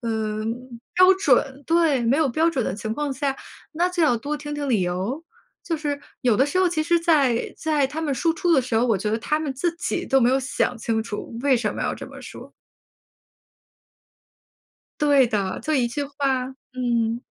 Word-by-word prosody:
呃， 215 -2 -2 0.5
标 370 +1 +7
准。 275 -5 +1
对。 325 -5 +2
没 235 +4 +2
有 310 -3 +2
标 320 +7 +2
准 265 -8 -1
的 - - -2
情 220 +1 -4
况 295 +3 -2
下， 270 0 -2 0.3
那 345 +3 +1
就 360 -2 -1
要 295 -6 +4
多 290 +6 -3
听 295 0 -7
听 290 -1 -3
理 230 -6 +2
由。 185 - -2 0.4
就 330 - -2
是 290 -2 -3 0.2
有 240 -5 +3
的 265 - +4
时 330 +6 -1
候 370 -1 +4
其 325 -2 -1
实 340 +2 +2
在 290 -8 +2
在 305 -3 +1
他 295 +4 -5
们 305 -3 -1
输 325 +6 +1
出 345 +2 +1
的 285 - +5
时 250 -2 -4
候， 225 +2 +3
我 225 -5 +2
觉 210 - -2
得 220 - +1
他 300 +7 0
们 300 -4 -3
自 335 +5 -1
己 - - -2
都 270 -1 +3
没 240 - +4
有 265 +1 +2
想 255 -1 -1
清 225 0 -1
楚 225 +1 -6
为 275 -3 +4
什 215 -3 -1
么 - - -6
要 - - -1
这 - - -8
么 - - -11
说。 - - -11 2.5
对 285 -3 +5
的， 200 -5 -2
就 310 - -1
一 255 -4 +2
句 240 +5 -3
话 275 -2 -1 0.3
嗯。 235 -2 0
270 Hz, 220 characters per minute, -23 LUFS, 235-310 Hz, 2.5 s, 标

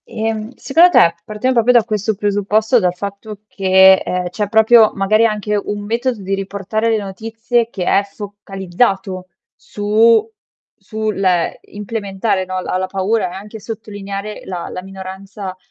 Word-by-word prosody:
Ehm, 220 -1 -3
secondo 330 +6 +4
te, 170 - +5
partiamo 215 +7 -1
proprio 235 +1 +4
da 240 -2 +5
questo 215 -1 -2
presupposto, 210 +3 +1
dal 180 -4 +1
fatto 200 +2 -7
che, 190 -1 +5
ehm, 180 -1 -2
c'è 205 +3 -3
proprio 220 0 +6
magari 215 +3 +3
anche 210 -1 -1
un 205 0 -3
metodo 235 +1 -2
di 195 +1 -3
riportare 200 +3 -2
le 225 - +2
notizie 225 +4 -2
che 190 -5 -5
è 200 - +3
focalizzato 195 -1 -3 0.3
su 220 +2 +2 0.5
su 215 +1 -3
l 195 -2 -1 0.5
implementare 205 -1 -2
no 185 0 -4
la 185 - -3
la 185 0 -2
paura 195 +2 -1
e - - -10
anche 210 +3 -9
sottolineare 205 -2 -7
la 180 -2 -5
la 180 - -6
minoranza 190 0 -8
205 Hz, 150 wpm, -17 LUFS, 195-220 Hz, 0.5 s, proprio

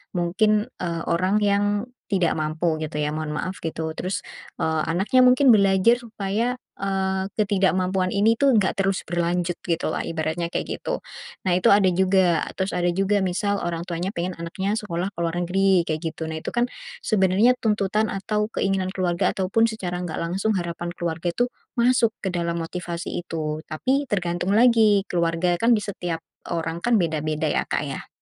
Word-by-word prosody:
mungkin, 210 +6 +2
eee, 170 -2 -2
orang 185 +5 +2
yang 200 0 +3 0.4
tidak 185 -5 +2
mampu 155 +1 -1
gitu 155 -1 -4
ya, 150 0 -1
mohon 155 0 -3
maaf, 185 +2 -4
gitu. 160 -1 -3
Terus, 185 +3 -4 0.3
eee, 160 -1 0
anaknya 195 +10 +3
mungkin 255 0 +6
belajar 195 +1 +5
supaya, 225 +2 -2 0.2
eee, 190 -1 -1
ketidakmampuan 190 -2 +1
ini, 205 +4 +3
tuh, 275 +4 +2
nggak 195 -1 +1
terus 195 -1 0
berlanjut, 175 +1 0
gitulah, 165 -2 -1
ibaratnya, 165 +1 -2
kayak - - -4
gitu. - - -3 0.4
Nah, 185 - +2
itu 180 0 +3
ada 200 -1 +6
juga. 185 -2 +3 0.2
Terus 190 0 -1
ada 175 0 +1
juga 195 +3 +1
misal 200 +2 0
orang 170 -1 -3
tuanya 175 +1 -3
pengen 180 -2 -3
anaknya 190 +4 -2
sekolah 195 -3 -3
ke - - -51
luar 170 0 -1
negeri, 185 0 +2
kayak 155 -1 -2
gitu. 160 -1 -4
Nah, 160 0 -5
itu, - - -4
kan, 240 0 +1 0.4
sebenarnya 200 +4 +4
tuntutan 210 0 +1
atau 210 +2 -1
keinginan 195 -1 0
keluarga, 185 -1 0
ataupun 200 +4 +1
secara 180 -5 -4
nggak 175 -3 -4
langsung 190 +5 0
harapan 175 -1 -4
keluarga 170 0 -2
itu 240 +8 +1 0.3
masuk 240 -1 +4 0.2
ke 190 - -1
dalam 170 -1 -1
motivasi 170 +1 -4
itu, 155 -3 -4
tapi 265 - 0
tergantung 175 -2 -1
lagi, 220 -4 +5
keluarga 170 0 0
kan 230 0 +5
di - - -3
setiap 175 -4 -4 0.2
orang 165 0 -3
kan, 240 +2 +3
beda-beda 155 -4 -1
ya, - - -1
Kak, - - -1
ya. - - -6
185 Hz, 170 wpm, -24 LUFS, 170-205 Hz, 0.4 s, mungkin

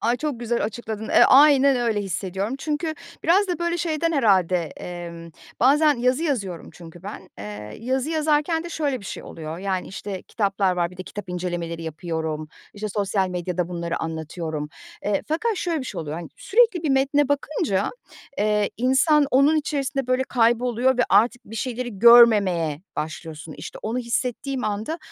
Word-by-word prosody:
Ay, 235 +2 +1
çok 285 -3 -3
güzel 235 -2 -1
açıkladın. 220 0 -5
Eee, - - +5
aynen, 280 -1 +6
öyle 230 -4 0
hissediyorum. 195 +4 -3
Çünkü 310 +2 -2 0.3
biraz 380 +4 +4
da 355 - -1
böyle 340 0 -1
şeyden 330 0 0
herhâlde, 185 - +3
emm, 170 -1 -8 0.3
bazen 295 +4 +5
yazı 255 +4 +1
yazıyorum 200 - -2
çünkü 170 0 -13
ben. 195 -2 -8
Eee, 105 +1 -8
yazı 260 +5 -1
yazarken 315 +1 +1
de - - -5
şöyle 290 -6 -2
bir - - -13
şey - - -6
oluyor, 160 0 -7
yani, 190 -1 -2
işte, 190 0 -6
kitaplar 195 -3 0
var, 175 -1 0
bir 180 - -14
de 185 - -6
kitap 200 -1 -8
incelemeleri 175 -2 -4
yapıyorum, 160 -1 -4 0.3
işte, 210 +1 -4
sosyal 200 -1 0
medyada 180 -1 -2
bunları 170 -1 -3
anlatıyorum. 160 -1 -4 0.4
Eee, 205 -1 0
fakat 415 +8 0
şöyle 335 -5 -1
bir - - -6
şey - - -5
oluyor, 155 0 -5
hani, 170 -2 -7
sürekli 440 -5 +3
bir 310 - 0
metne 275 +1 +2
bakınca, 285 - 0 0.5
eee, 210 0 +1
insan 275 +5 +3
onun 280 +4 +4
içerisinde 275 -3 -1
böyle 255 +1 +2
kayboluyor 245 0 +2
ve 245 - +5
artık 230 +5 +3
bir 225 - -9
şeyleri 240 -3 -4
görmemeye 200 -9 +6 0.2
başlıyorsun. 160 0 -6
İşte, - - -8
onu 225 +3 -2
hissettiğim 250 +2 -2
anda 215 +10 -2
225 Hz, 165 wpm, -23 LUFS, 180-275 Hz, 0.5 s, aynen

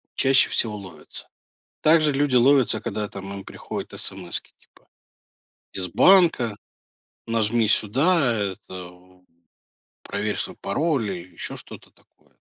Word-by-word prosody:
чаще 135 -1 +4
всего 110 -3 -1
ловятся. 95 -3 -10 0.5
Также 155 -1 +4
люди 140 -1 +1
ловятся, 125 -3 +4
когда 105 0 -3
там 100 -1 -8
им 100 -1 -8
приходят - - -7
эсэмэски 95 -2 -2
типа - - -27 0.9
из 95 -1 -2
банка: 145 - +4 0.7
"Нажми 115 0 +2
сюда", 130 - +3
э 100 -3 -1
это 95 -2 -10
в 90 +1 -21 0.8
"Проверь 105 +1 -3
свой - - -4
пароль" 130 +1 0
или 90 -1 -7
еще - - -7
что-то - - -11
такое. - - -31
110 Hz, 125 wpm, -23 LUFS, 95-135 Hz, 0.9 s, чаще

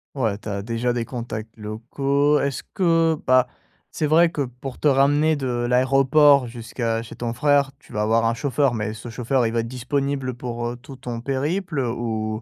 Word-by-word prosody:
Ouais, 110 -6 0
tu 105 - -8
as 100 0 -3
déjà 115 +3 -1
des 120 -1 -2
contacts 115 -3 -6
locaux. 135 +7 0
Est-ce 140 -2 -2
que 165 -4 +3
bah, 130 0 +4 0.4
c'est 155 - -1
vrai 165 +2 +5
que 150 - -3
pour 125 0 -6
te 150 - +2
ramener 145 +3 +3
de 135 - -3
l'aéroport 130 +3 +4
jusqu'à 115 -1 -3
chez 115 - -10
ton 120 -1 -3
frère, 140 +1 +2
tu - - -17
vas 105 - -1
avoir 115 +2 +2
un 115 - +2
chauffeur, 135 +1 +1
mais 110 -1 -2
ce 115 +2 -9
chauffeur, 125 +1 0
il 115 - -3
va 115 - +1
être 115 - -6
disponible 135 +1 -2
pour, 120 -1 -4
heu, 120 - -4
tout 135 +2 -12
ton 120 -2 -6
périple? 150 +5 -2
Ou 110 -3 -2
125 Hz, 195 wpm, -23 LUFS, 115-140 Hz, 0.4 s, vrai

